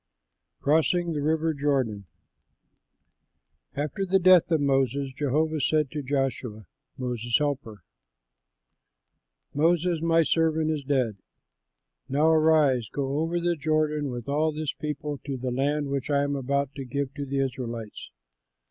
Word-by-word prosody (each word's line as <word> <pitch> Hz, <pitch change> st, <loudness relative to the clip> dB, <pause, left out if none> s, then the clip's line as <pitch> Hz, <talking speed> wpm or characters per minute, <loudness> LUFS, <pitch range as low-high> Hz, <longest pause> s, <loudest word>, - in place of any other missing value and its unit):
CROSSING 165 Hz, +3 st, +2 dB
THE 150 Hz, -, -2 dB
RIVER 160 Hz, +2 st, +1 dB
JORDAN 135 Hz, -8 st, -1 dB, 1.7 s
After 150 Hz, +6 st, -2 dB
the 195 Hz, 0 st, +3 dB
death 185 Hz, -2 st, +5 dB
of 160 Hz, -2 st, +2 dB
Moses, 135 Hz, -1 st, +1 dB
Jehovah 150 Hz, +3 st, 0 dB
said 150 Hz, -1 st, +1 dB
to 150 Hz, -, -3 dB
Joshua, 130 Hz, -6 st, -2 dB, 0.3 s
Moses' 120 Hz, -3 st, 0 dB
helper, 135 Hz, -, -3 dB, 1.7 s
"Moses 165 Hz, +2 st, +2 dB
my 165 Hz, 0 st, +3 dB
servant 160 Hz, 0 st, +1 dB
is 150 Hz, -2 st, -3 dB
dead: 130 Hz, -7 st, 0 dB, 0.9 s
Now 150 Hz, +4 st, +3 dB
arise, 155 Hz, -7 st, +3 dB
go 140 Hz, +1 st, -2 dB
over 165 Hz, +2 st, 0 dB
the 175 Hz, 0 st, 0 dB
Jordan 155 Hz, -1 st, 0 dB
with 120 Hz, -2 st, -6 dB
all 150 Hz, +3 st, +1 dB
this 155 Hz, -1 st, -3 dB
people 150 Hz, -1 st, -4 dB
to 135 Hz, 0 st, -5 dB
the 125 Hz, 0 st, -3 dB
land 140 Hz, +3 st, 0 dB
which 140 Hz, 0 st, -2 dB
I 140 Hz, -1 st, +2 dB
am 145 Hz, 0 st, -1 dB
about 140 Hz, +1 st, -1 dB
to 135 Hz, -, -4 dB
give 140 Hz, +1 st, -3 dB
to 145 Hz, -, -5 dB
the 140 Hz, +1 st, -2 dB
Israelites. 120 Hz, -5 st, -4 dB
145 Hz, 135 wpm, -26 LUFS, 135-155 Hz, 1.7 s, death